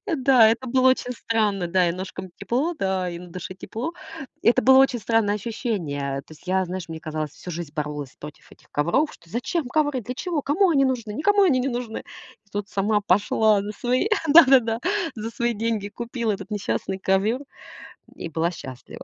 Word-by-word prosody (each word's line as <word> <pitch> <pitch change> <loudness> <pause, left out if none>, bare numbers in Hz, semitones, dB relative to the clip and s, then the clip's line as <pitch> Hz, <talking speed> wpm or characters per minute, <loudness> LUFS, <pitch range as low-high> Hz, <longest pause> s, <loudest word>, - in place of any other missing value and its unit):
Э, 355 - 0
да, 255 -5 +6
это 235 +3 0
было 260 +1 +4
очень 250 -1 -1
странно. 215 -6 0
Да, 180 0 +3
и 170 - 0
ножкам 185 +1 -6
тепло, 260 +12 -1
да, 190 -2 0
и 170 -1 -6
на 180 - -11
душе 185 +2 -7
тепло. 230 - -5 0.5
Это 240 +2 +4
было 265 +1 +6
очень 265 -2 +4
странное 215 -1 +1
ощущение. 170 - -3
Э, - - -3
то 155 - -17
есть 155 - -17
я, 190 +1 +2
знаешь, 180 -1 -5
мне 160 0 -6
казалось, 155 -2 -4
всю 180 - -10
жизнь 170 -3 -6
боролась 150 -3 -4
против 150 0 -12
этих - - -21
ковров, 170 - +1
что: 165 - -20
"Зачем 250 - -2
ковры? 290 -3 0
Для 250 +4 -5
чего? 315 +1 -2
Кому 365 +7 +2
они 275 -5 +4
нужны? 235 -5 -1
Никому 405 - +3
они 265 -8 +3
не 270 - 0
нужны". 240 -2 -4 0.5
И - - -31
тут 205 0 -3
сама 205 +2 +1
пошла 205 +2 +3
на 210 +1 -5
свои, 250 - 0 0.2
да-да-да, 260 -7 +6 0.3
за 225 0 -5
свои 235 0 -1
деньги 220 -2 -2
купила 235 0 -3
этот 200 - -7
несчастный 195 -2 -2
ковёр 195 +7 +1 0.8
и, - - -6
м, 165 - -12
была 165 +1 +1
счастлива. 130 -7 -10
220 Hz, 200 wpm, -24 LUFS, 185-255 Hz, 0.8 s, да